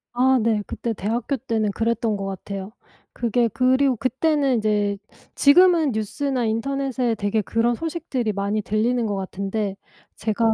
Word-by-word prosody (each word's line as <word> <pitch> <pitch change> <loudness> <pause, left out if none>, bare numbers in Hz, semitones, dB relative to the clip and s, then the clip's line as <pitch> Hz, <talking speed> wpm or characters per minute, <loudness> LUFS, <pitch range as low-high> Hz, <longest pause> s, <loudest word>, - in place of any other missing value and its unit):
아 260 +2 +4
네. 220 -2 +1
그때 235 - -3
대학교 230 +7 -2
때는 225 -4 -1
그랬던 225 0 0
것 195 - -4
같아요. 195 +1 -6 0.4
그게 235 0 +1
그리고 260 +4 +2
그때는 270 +3 +1
인제 210 -2 +1 0.4
지금은 330 0 +5
뉴스나 245 +4 -1
인터넷에 255 +1 -1
되게 205 +1 0
그런 230 +4 +1
소식들이 265 -5 -2
많이 200 +1 -1
들리는 225 +4 0
것 205 - -1
같은데 195 +1 -3 0.4
제가 220 +1 +1
230 Hz, 315 characters per minute, -23 LUFS, 210-260 Hz, 0.4 s, 지금은